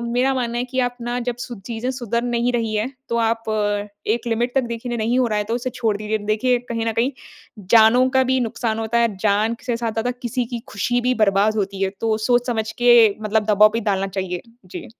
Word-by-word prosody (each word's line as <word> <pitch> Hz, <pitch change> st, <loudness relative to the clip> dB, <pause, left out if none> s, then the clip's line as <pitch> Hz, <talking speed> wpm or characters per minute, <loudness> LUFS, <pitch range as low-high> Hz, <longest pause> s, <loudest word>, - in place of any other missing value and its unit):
मेरा 255 Hz, +2 st, +2 dB
मानना 240 Hz, -2 st, -2 dB
है 245 Hz, -, -1 dB
कि 255 Hz, +1 st, -6 dB
आप 245 Hz, 0 st, -1 dB
ना 240 Hz, +1 st, -2 dB
जब 245 Hz, -, -1 dB
ची 245 Hz, -, -6 dB
चीज़ें 235 Hz, +2 st, -3 dB
सुधर 235 Hz, -2 st, -2 dB
नहीं 240 Hz, 0 st, 0 dB
रही 225 Hz, -2 st, -1 dB
है 215 Hz, +3 st, 0 dB, 0.2 s
तो 235 Hz, -, -1 dB
आप 225 Hz, 0 st, 0 dB
अ, 205 Hz, -1 st, 0 dB, 0.2 s
एक 230 Hz, +2 st, -1 dB
लिमिट 235 Hz, +2 st, -1 dB
तक 270 Hz, -, +3 dB
देखिए 235 Hz, +1 st, -4 dB
नहीं 230 Hz, +3 st, 0 dB
हो 255 Hz, -, +3 dB
रहा 215 Hz, -2 st, 0 dB
है 210 Hz, -, -1 dB
तो 225 Hz, +3 st, -2 dB
उसे 245 Hz, +1 st, -3 dB
छोड़ 225 Hz, -4 st, -1 dB
दीजिए। 215 Hz, +1 st, -2 dB
देखिए 215 Hz, +4 st, +1 dB
कहीं 230 Hz, -1 st, -2 dB
न 225 Hz, -, +1 dB
कहीं 245 Hz, +5 st, 0 dB, 0.6 s
जानो 235 Hz, +3 st, +6 dB
का 265 Hz, -, +5 dB
भी 260 Hz, -, +3 dB
नुकसान 225 Hz, -1 st, -2 dB
होता 225 Hz, +1 st, 0 dB
है, 230 Hz, -4 st, +1 dB
जान 215 Hz, +3 st, +1 dB
से 240 Hz, -, 0 dB
ज़्यादा 230 Hz, +1 st, -2 dB
किसी 245 Hz, 0 st, -3 dB
की 235 Hz, -, -3 dB
खुशी 245 Hz, +5 st, -1 dB
भी 250 Hz, +1 st, +1 dB
बर्बाद 200 Hz, +2 st, +2 dB
होती 195 Hz, -1 st, -2 dB
है, 190 Hz, -, +1 dB
तो 220 Hz, -1 st, +1 dB
सोच 245 Hz, 0 st, +2 dB
समझ 220 Hz, -3 st, -1 dB
के 240 Hz, 0 st, +4 dB, 0.3 s
मतलब 215 Hz, 0 st, +1 dB
दबाव 210 Hz, +1 st, +6 dB
भी 230 Hz, -, 0 dB
डालना 195 Hz, 0 st, 0 dB
चाहिए। 185 Hz, -2 st, -4 dB, 0.2 s
जी। -, -, -8 dB
230 Hz, 230 wpm, -21 LUFS, 215-245 Hz, 0.6 s, जानो